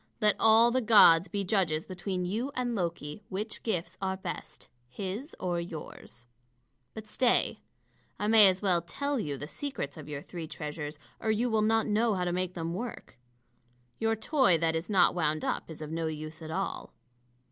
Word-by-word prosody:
Let 210 -2 +4
all 225 +2 +6
the 255 +1 +1
gods 200 -6 +7
be 200 -1 -2
judges 180 -6 0
between 185 0 -3
you 225 +9 -2
and 245 -1 -1
Loki, 170 -3 -3
which 210 +3 -4
gifts 175 -5 -3
are 190 -1 -1
best, 190 - -7 0.2
his 200 - -5
or 175 -2 -1
yours. 155 -8 -9 0.7
But 220 -1 -7
stay 240 +3 +1 0.6
I 205 - -2
may 215 -1 +8
as 185 +1 +1
well 180 -4 +3
tell 280 +11 -2
you 145 -8 -3
the 145 - -7
secrets 265 - -5
of 150 -1 -9
your 145 -1 -5
three 170 -3 -7
treasures, 150 -1 -6 0.2
or 220 - -2
you 230 +3 +1
will 220 -1 +3
not 225 +1 +3
know 220 +1 +2
how 180 - -1
to 175 - -1
make 180 0 -2
them 165 -1 -3
work. 230 - -7 0.8
Your 225 0 +1
toy 225 - +3
that 165 0 +1
is 160 +4 -3
not 195 -3 +4
wound 155 -3 0
up - - -2
is 155 -1 -8
of 155 - -7
no 165 0 -1
use 155 +1 -6
at 160 - -7
all." 195 +4 -4
185 Hz, 185 wpm, -30 LUFS, 165-220 Hz, 0.8 s, may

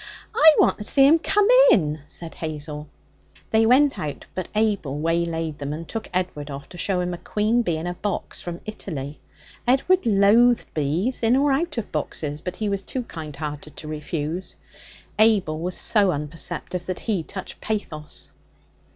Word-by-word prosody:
'I 320 -8 +7
want - - +4
to - - -4
see 270 +5 +5
'em 315 +4 +6
come 405 +4 +2 0.2
in,' 155 -5 +3
said 165 -1 -7
Hazel. 150 -1 -6 0.6
They 220 0 +4
went 270 +4 +4
out, 150 -2 -5
but 185 -1 -4
Abel 205 -10 0
waylaid 165 -1 -1
them, 145 +1 -3
and 165 +2 -6
took 225 -1 -5
Edward 180 -5 -2
off 140 0 -7
to 175 - -11
show 185 -3 0
him 180 0 -2
a 175 - -6
queen 215 +6 +1
bee 170 -8 -1
in 160 - -5
a 175 - -2
box 200 +2 -4
from 175 -1 -6
Italy. 155 -9 -6 0.5
Edward 275 +7 +3
loathed 225 +4 +4
bees 160 - 0
in 230 +2 +4
or 280 +1 +3
out 305 +2 0
of 230 - -4
boxes, 150 -1 -3
but 180 +1 -5
he 215 - -2
was 200 -1 0
too 255 +5 -4
kind 155 -9 -8
hearted 150 0 -6
to 155 - -7
refuse. 155 +3 -4 0.6
Abel 200 -8 +3
was 180 +2 -3
so 205 -4 +3
unperceptive 165 +4 -4
that 185 - -3
he 210 -6 0
touched 190 +4 -8
pathos. 150 - -5
180 Hz, 175 wpm, -23 LUFS, 155-220 Hz, 0.6 s, I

